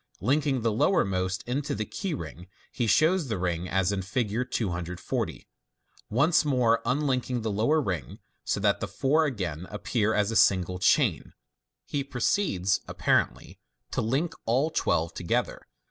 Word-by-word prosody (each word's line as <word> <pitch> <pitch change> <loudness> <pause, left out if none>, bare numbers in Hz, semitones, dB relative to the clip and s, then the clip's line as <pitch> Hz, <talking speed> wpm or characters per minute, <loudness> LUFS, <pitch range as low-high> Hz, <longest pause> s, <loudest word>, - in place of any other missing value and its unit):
Linking 135 - +1
the 115 - +2
lowermost 95 - +1
into 135 +4 -2
the 110 - -2
key 190 - -4
ring, 85 - -8 0.2
he 120 - -1
shows 160 - +3
the 110 -5 -2
rings 90 -1 -2
as 95 0 +2
in 100 -1 -1
Fig. 105 +2 -2
240. 90 -6 -3 0.6
Once 150 +8 +3
more 125 -6 +2
unlinking 130 -3 0
the 110 - -1
lower 115 +10 +2
ring, 90 - -3 0.3
so - - -1
that - - +2
the - - -3
four 155 +4 +2
again 95 - -3
appear 110 +1 0
as 105 +1 +1
a - - -3
single 90 -3 +3
chain, 90 - +2 0.5
he 140 -1 -2
proceeds 125 - 0
(apparently) - - 0 0.3
to - - -1
link 135 +10 0
all 135 +8 +2
the - - -22
twelve 85 0 +1
together. 85 - -2
110 Hz, 150 wpm, -27 LUFS, 95-140 Hz, 0.6 s, shows